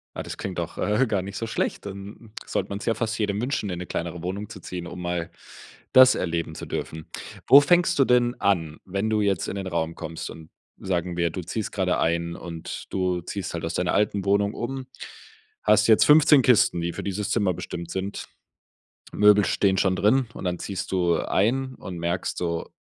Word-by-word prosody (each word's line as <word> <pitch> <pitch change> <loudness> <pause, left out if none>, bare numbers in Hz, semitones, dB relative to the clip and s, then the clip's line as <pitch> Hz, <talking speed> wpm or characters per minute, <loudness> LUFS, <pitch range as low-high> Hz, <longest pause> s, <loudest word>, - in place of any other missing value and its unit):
Ah, - - -4
das - - -7
klingt - - -4
doch, - - -5
äh, 110 +5 +1
gar 100 -4 0
nicht 100 +1 -7
so 115 - -3
schlecht, 115 - -2
dann 100 +3 -9
sollte 95 - -2
man's 100 +1 -5
ja 115 - +2
fast 115 0 -2
jedem 105 -1 -1
wünschen, 120 -5 -2
in 90 -1 -4
'ne 90 - -5
kleinere 85 0 -4
Wohnung 100 +4 -4
zu 105 -3 -9
ziehen, 90 -1 -6
um 90 +1 -8
mal 85 -1 -3 0.6
das 130 0 +8
erleben 85 -1 -2
zu - - -7
dürfen. 80 0 -5 0.4
Wo 140 - +10
fängst 175 +4 +3
du - - +7
denn 125 0 +3
an, 80 -6 +1
wenn 100 +3 -2
du 105 -1 +1
jetzt 100 -4 0
in - - -4
'nen 95 -1 -4
Raum 85 -2 -2
kommst 80 0 -6
und 80 -1 -11 0.3
sagen 90 -2 -2
wir, 85 -1 +1
du 90 - -5
ziehst 105 +4 -4
gerade 95 -2 0
ein 85 +1 0
und 85 -2 -7
du 90 -2 -1
ziehst 95 +2 -5
halt 85 - -4
aus 80 - -3
deiner 90 0 0
alten 100 -2 +1
Wohnung 100 +1 +2
um, 130 +2 -4 0.8
hast 105 +1 +4
jetzt 110 - +6
15 150 -1 +7
Kisten, 115 -8 +4
die 85 - -1
für - - -6
dieses 100 0 -3
Zimmer 100 -5 +2
bestimmt 85 0 -6
sind, 95 +1 -4 0.9
Möbel 105 0 +5
stehen 95 -1 +2
schon 95 0 +2
drin 125 +5 +3
und - - -8
dann 90 -1 -1
ziehst 95 -1 -5
du 90 -3 +2
ein 130 +6 0
und 90 -2 -8
merkst 85 +2 -2
so, 85 -2 -2
95 Hz, 205 wpm, -25 LUFS, 85-105 Hz, 0.9 s, Wo